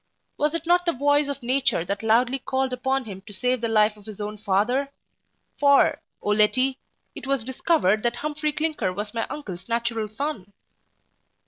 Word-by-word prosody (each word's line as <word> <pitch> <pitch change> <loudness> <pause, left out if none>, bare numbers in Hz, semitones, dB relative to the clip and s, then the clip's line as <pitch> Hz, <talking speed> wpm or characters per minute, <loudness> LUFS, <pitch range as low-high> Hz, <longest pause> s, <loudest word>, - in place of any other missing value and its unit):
Was 300 +2 0
it 335 - -3
not 355 +1 +3
the 340 - +4
voice 285 +2 +2
of 280 -2 -5
nature 255 -8 +1
that 200 +2 -3
loudly 240 +4 +2
called 265 0 -1
upon 265 +1 -1
him 195 -3 -8
to 205 - -8
save 250 +3 0
the 230 - 0
life 215 -1 +3
of 210 0 -17
his 215 -2 -9
own 210 0 -4
father? 215 +7 +1 0.7
for, 280 -1 +4 0.2
0 210 0 +1
Letty, 255 +5 +3 0.3
it - - -9
was 275 -4 0
discovered 250 - +1
that 240 +1 0
Humphry 300 +2 -2
Clinker 305 -10 -1
was 205 +3 -5
my 230 -1 -2
uncle's 190 -9 -7
natural 230 -1 -1
son. 215 -4 -5
245 Hz, 180 wpm, -24 LUFS, 210-280 Hz, 0.7 s, the